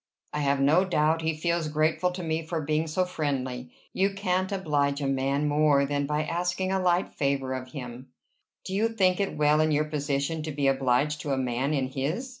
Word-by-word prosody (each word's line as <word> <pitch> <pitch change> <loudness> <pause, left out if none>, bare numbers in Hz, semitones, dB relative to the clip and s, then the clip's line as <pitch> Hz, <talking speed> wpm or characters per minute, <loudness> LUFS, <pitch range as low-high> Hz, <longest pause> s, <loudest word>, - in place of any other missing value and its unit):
"I 150 - -1
have 140 -1 +1
no 150 +7 +4
doubt 160 -3 +1
he 160 0 0
feels 170 0 0
grateful 155 +3 +1
to 180 0 -5
me 160 0 -1
for 165 +1 -3
being 155 +1 0
so 180 +4 0
friendly. 130 -7 -3 0.2
You 195 +1 +1
can't 185 -1 0
oblige 145 -7 0
a 140 - -2
man 135 +2 0
more 145 -1 +3
than 145 0 -1
by 150 +1 0
asking 175 +3 -1
a 190 - +1
light 180 0 +2
favor 140 -2 -1
of 130 0 -6
him." 125 -1 -7 0.6
"Do 190 - -5
you 215 +4 +2
think 190 -5 +2
it 200 -5 -1
well 150 +1 +4
in 155 - +2
your 150 0 +2
position 150 +1 -2
to 155 0 -4
be 145 -1 -2
obliged 135 +2 +2
to 145 - -2
a - - 0
man 130 +3 -1
in 130 -2 -1
his?" 155 - -3
150 Hz, 210 wpm, -27 LUFS, 140-170 Hz, 0.6 s, no